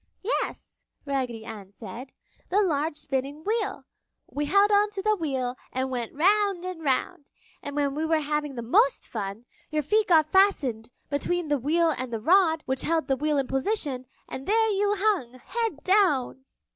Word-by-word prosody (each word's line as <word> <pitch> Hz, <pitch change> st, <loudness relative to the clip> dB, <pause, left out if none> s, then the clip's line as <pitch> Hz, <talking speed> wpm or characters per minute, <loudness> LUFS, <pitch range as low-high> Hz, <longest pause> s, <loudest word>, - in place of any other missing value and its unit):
"Yes," 455 Hz, -, -3 dB, 0.2 s
Raggedy 255 Hz, -5 st, -2 dB
Ann 205 Hz, -4 st, -9 dB
said. 230 Hz, +6 st, -9 dB, 0.4 s
"The 390 Hz, -, +3 dB
large 310 Hz, -3 st, 0 dB
spinning 280 Hz, +2 st, -3 dB
wheel. 435 Hz, +3 st, -1 dB, 0.4 s
We 295 Hz, +1 st, -3 dB
held 400 Hz, +5 st, +4 dB
on 410 Hz, +1 st, +4 dB
to 405 Hz, -2 st, -4 dB
the 430 Hz, 0 st, +3 dB
wheel 265 Hz, -8 st, -2 dB, 0.2 s
and 260 Hz, +1 st, -2 dB
went 240 Hz, -1 st, -4 dB
round 390 Hz, +2 st, +2 dB
and 365 Hz, -3 st, -5 dB
round! 275 Hz, +1 st, -1 dB, 0.3 s
And 285 Hz, 0 st, -6 dB
when 285 Hz, -1 st, +1 dB
we 305 Hz, +2 st, -2 dB
were 320 Hz, -1 st, +3 dB
having 295 Hz, -1 st, -2 dB
the 235 Hz, -, -4 dB
most 250 Hz, +3 st, +3 dB
fun, 210 Hz, +1 st, -5 dB, 0.2 s
your 305 Hz, 0 st, -1 dB
feet 425 Hz, +8 st, +2 dB
got 320 Hz, -3 st, +5 dB
fastened 275 Hz, -, +2 dB, 0.2 s
between 340 Hz, +3 st, -1 dB
the 290 Hz, -1 st, +2 dB
wheel 325 Hz, +5 st, +2 dB
and 255 Hz, -1 st, -5 dB
the 225 Hz, -, -2 dB
rod 325 Hz, -, +4 dB
which 265 Hz, 0 st, -1 dB
held 330 Hz, -1 st, 0 dB
the 270 Hz, -, +3 dB
wheel 300 Hz, +2 st, 0 dB
in 275 Hz, -, +1 dB
position 270 Hz, -, -1 dB, 0.2 s
and 265 Hz, -, -7 dB
there 445 Hz, +1 st, +3 dB
you 410 Hz, 0 st, +1 dB
hung, 380 Hz, -, +1 dB
head 430 Hz, -, -4 dB
down!" 300 Hz, -10 st, +2 dB
295 Hz, 175 wpm, -26 LUFS, 260-380 Hz, 0.4 s, got